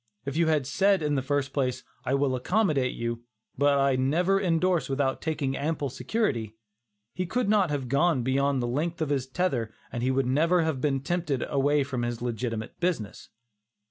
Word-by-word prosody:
If 140 0 -4
you 165 0 +2
had 155 -4 +2
said 195 +5 +2
in 150 -1 +1
the 135 - +1
first 140 0 -1
place, 130 -3 -1 0.2
"I 135 - +1
will 135 -2 +1
accommodate 145 - +1
you, 115 0 -3 0.3
but 145 +1 +3
I 135 -1 +3
never 170 +9 +2
indorse 180 -2 +1
without 135 -1 0
taking 150 -4 -1
ample 145 -1 -2
security," 125 - -1 0.6
he 185 0 -3
could 245 +4 0
not 205 -4 +3
have 140 -3 -2
gone 140 +1 +2
beyond 135 0 +1
the - - -1
length 160 +7 -2
of 150 - -3
his 135 -3 0
tether 130 -7 -1 0.2
and 120 - -4
he 125 - +1
would 130 0 +1
never 165 +7 +3
have 155 -5 -1
been 135 -2 +1
tempted 155 -3 -1
away 145 +1 +2
from 130 -3 -3
his 120 -1 -2
legitimate 115 -2 -4
business. 170 - -2
140 Hz, 185 wpm, -27 LUFS, 130-165 Hz, 0.6 s, but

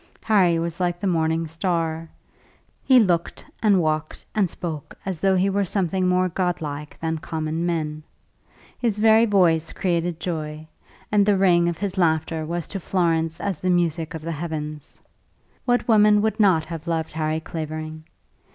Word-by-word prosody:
Harry 190 -6 +4
was 170 +1 -3
like 175 -1 0
the 200 - -4
morning 165 -2 +1
star. 165 -1 -2 0.7
He 260 -2 +6
looked 175 -6 0 0.2
and 205 -4 +4
walked 155 -2 -2
and 200 -4 +2
spoke 160 -5 -6
as 190 -4 -3
though 195 +2 +3
he 185 +1 +2
were 200 +1 +1
something 185 -1 0
more 180 0 +2
godlike 160 -5 -3
than 160 -1 -2
common 160 +2 -3
men. 155 -3 -2 0.8
His 230 -4 0
very 220 +2 +5
voice 170 -6 +3
created 170 -2 -1
joy, 155 -3 -4 0.4
and 205 -1 +4
the 200 -1 +3
ring 175 -3 +4
of 170 - -4
his 195 -1 -3
laughter 160 -1 +1
was 170 0 -3
to 195 - -4
Florence 165 -3 0
as 195 -6 -3
the 185 - 0
music 165 -3 0
of 160 - -7
the 165 - -3
heavens. 155 -2 -6 0.7
What 245 -1 +1
woman 210 -2 +5
would 220 0 0
not 185 -7 +4
have 165 -2 -7
loved 165 -1 -1
Harry 155 0 -1
Clavering? 155 -1 -6
170 Hz, 160 wpm, -23 LUFS, 160-190 Hz, 0.8 s, He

